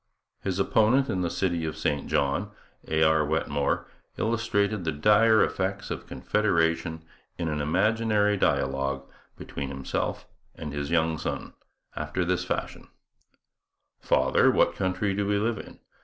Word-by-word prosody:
His 95 -2 -2
opponent 110 +7 +3
in 95 - -1
the 85 - 0
city 85 -3 -1
of 80 -1 -3
St 75 -2 -1
John, 70 +9 0 0.4
A. 80 0 +2
R. 80 0 +4
Wetmore, 75 -2 0 0.3
illustrated 110 -3 0
the 80 - 0
dire 105 +8 +5
effects 95 +1 -2
of - - -5
Confederation 80 -5 0 0.3
in 85 - -2
an 75 -1 -2
imaginary 105 +5 +2
dialogue, 70 -5 0 0.3
between 70 -1 -6
himself 70 -1 -3 0.3
and 75 -2 -6
his 70 -1 -3
young 80 -2 +1
son, - - -4 0.4
after 75 +4 -2
this 90 0 0
fashion: 90 - -4 1.1
'Father, 65 0 +3
what - - +3
country 95 +1 -1
do 100 0 -1
we 105 0 +2
live 110 +1 0
in?' - - -11
90 Hz, 140 wpm, -27 LUFS, 75-105 Hz, 1.1 s, dire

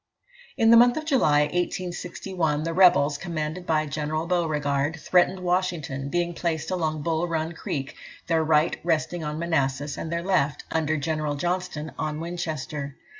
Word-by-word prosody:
In 225 0 +5
the 230 - +9
month 245 +2 +6
of 310 - -3
July, 200 - +3
1861, 175 -1 -2
the 165 +1 -2
rebels, 155 -5 +5
commanded 165 +1 -4
by 155 -1 +2
General 155 +2 -2
Beauregard, 155 -3 0
threatened 185 +3 +2
Washington, 175 -7 -1
being 175 +2 0
placed 165 0 -2
along 155 -4 -1
Bull 165 +1 0
Run 160 -1 -2
Creek, 140 -4 -5 0.3
their 165 -1 +2
right 155 0 +3
resting 165 0 0
on 150 0 -3
Manassas, 145 -4 -1
and 160 - -5
their 170 0 -1
left, 150 -6 +1
under 155 -1 0
General 155 0 -1
Johnston, 175 -1 -2
on 155 0 -2
Winchester. 155 -4 -4
160 Hz, 150 wpm, -25 LUFS, 150-175 Hz, 0.3 s, the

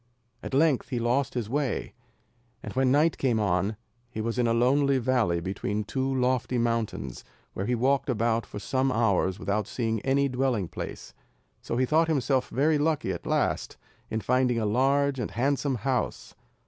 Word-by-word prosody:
At - - -4
length 145 -2 +2
he 130 - -2
lost 125 +4 0
his 120 -4 -2
way, 135 0 -2 0.7
and - - -6
when 130 -1 +2
night 155 +4 +3
came 120 -5 +1
on 100 +1 0 0.3
he 110 - -7
was 115 +2 -2
in 120 - +3
a - - +2
lonely 135 +4 +3
valley 120 -9 +1
between 100 +4 -3
two 130 +5 -2
lofty 125 -1 +1
mountains, 115 - -2 0.3
where 95 - -3
he 125 - +1
walked 135 +4 +1
about 115 -1 +1
for 105 - -9
some 130 +6 0
hours 100 -5 +1
without 100 +1 -1
seeing 115 -3 -2
any 140 +1 +2
dwelling 125 -7 0
place, - - -7 0.5
so - - -3
he 130 - +3
thought 160 +5 +3
himself 135 -4 +1
very 150 +3 +2
lucky 155 0 0
at - - -6
last, - - 0 0.3
in 110 - -2
finding 125 0 +2
a 110 - 0
large 135 +5 +2
and - - -2
handsome 135 +3 0
house. 125 +2 -2
125 Hz, 175 wpm, -27 LUFS, 110-135 Hz, 0.7 s, night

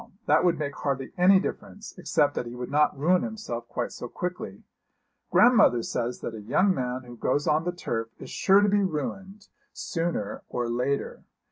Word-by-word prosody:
That 155 +3 +4
would 175 -2 +3
make 145 -2 -3
hardly 135 -2 -2
any 190 +1 +6
difference, 205 +2 -6
except 145 -5 +1
that 120 - -3
he 120 - -7
would 125 +1 -6
not 150 0 +2
ruin 175 +6 +3
himself 210 - -5
quite 120 - -3
so 120 - -7
quickly. 180 +7 -6 0.7
Grandmother 230 - +5
says 120 +1 -3
that 115 - -5
a 110 - -7
young 185 - +2
man 125 -3 -3
who 120 -1 -11
goes 140 +5 0
on 155 +1 +2
the 175 - 0
turf 115 -10 -4
is - - -10
sure 195 +1 +4
to 205 - +3
be 205 0 +3
ruined 195 +4 -4 0.2
sooner 165 - -3
or 120 -1 -2
later. 125 +4 -2
150 Hz, 180 wpm, -26 LUFS, 125-185 Hz, 0.7 s, any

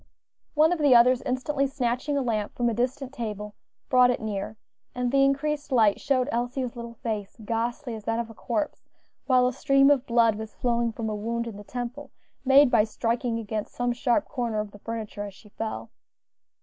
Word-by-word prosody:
One 310 +2 +5
of 355 - 0
the 285 -4 +5
others, 250 +1 +6
instantly 275 +2 0
snatching 265 +2 -1
a 275 - +1
lamp 215 -4 -2
from 240 - +1
a - - -1
distant 255 +3 -2
table, 210 -4 -5 0.3
brought 250 -1 +5
it 245 - 0
near, 215 0 -4 0.4
and 250 -1 -1
the 275 0 +4
increased 290 +2 0
light 220 -5 +4
showed 260 -2 +1
Elsie's 245 +1 -2
little 235 0 -7
face, 215 -3 -4
ghastly 235 +4 -2
as 215 -2 -8
that 225 0 0
of 235 -1 -2
a 225 - -11
corpse, 260 +7 -3 0.4
while 255 -1 +5
a 250 - -1
stream 275 +1 +4
of 275 -2 +2
blood 230 -3 +3
was 220 -1 -7
flowing 235 -1 0
from 225 0 -4
a 215 - -2
wound 230 +3 -2
in 230 -3 -6
the 205 - -9
temple, 250 +5 -6 0.3
made 270 0 +6
by 225 -3 +5
striking 230 +2 -1
against 215 -1 -4
some 245 0 0
sharp 245 +4 +1
corner 235 -4 -2
of 210 -1 -4
the 205 - -14
furniture 220 -2 -5
as 200 -2 -6
she 210 - -17
fell. 220 +1 -5
240 Hz, 200 wpm, -26 LUFS, 225-265 Hz, 0.4 s, others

